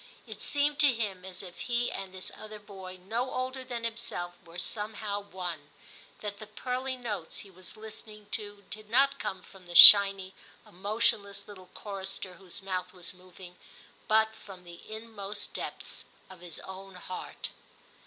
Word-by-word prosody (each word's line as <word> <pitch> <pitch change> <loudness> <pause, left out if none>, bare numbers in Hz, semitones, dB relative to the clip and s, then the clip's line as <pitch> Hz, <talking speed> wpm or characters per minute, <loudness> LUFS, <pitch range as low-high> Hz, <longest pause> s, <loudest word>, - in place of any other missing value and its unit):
It - - -9
seemed 290 0 +1
to 290 -3 +7
him 205 -6 -2
as 190 0 -7
if 180 -2 -11
he 240 -1 0
and 195 -1 -5
this 185 0 -4
other 215 0 -8
boy 190 -3 -9
no 225 +8 -2
older 260 +1 -2
than 240 -2 -4
himself 225 -6 -2
were 170 0 -12
somehow 210 +1 -1
one, 180 -7 -6 0.5
that 205 -1 -4
the 215 - -8
pearly 255 +4 -3
notes 210 -9 -4
he 200 - -13
was 185 +3 -9
listening 215 -1 -11
to 205 -2 -4
did 215 0 -7
not 275 +4 +4
come 185 -1 -3
from 185 -2 -15
the 175 - -8
shiny 195 -1 +11 0.3
emotionless 200 +1 0
little 185 -3 -12
chorister 195 -2 -5
whose 185 +1 -9
mouth 185 -1 -3
was 180 -1 -5
moving, 180 0 -13 0.5
but 220 0 +4
from 195 -4 -12
the 175 -1 -11
inmost 215 -2 -6
depths - - -5 0.3
of 185 - -12
his 175 -2 -6
own 190 0 -9
heart. 180 0 -5
200 Hz, 160 wpm, -30 LUFS, 185-220 Hz, 0.5 s, shiny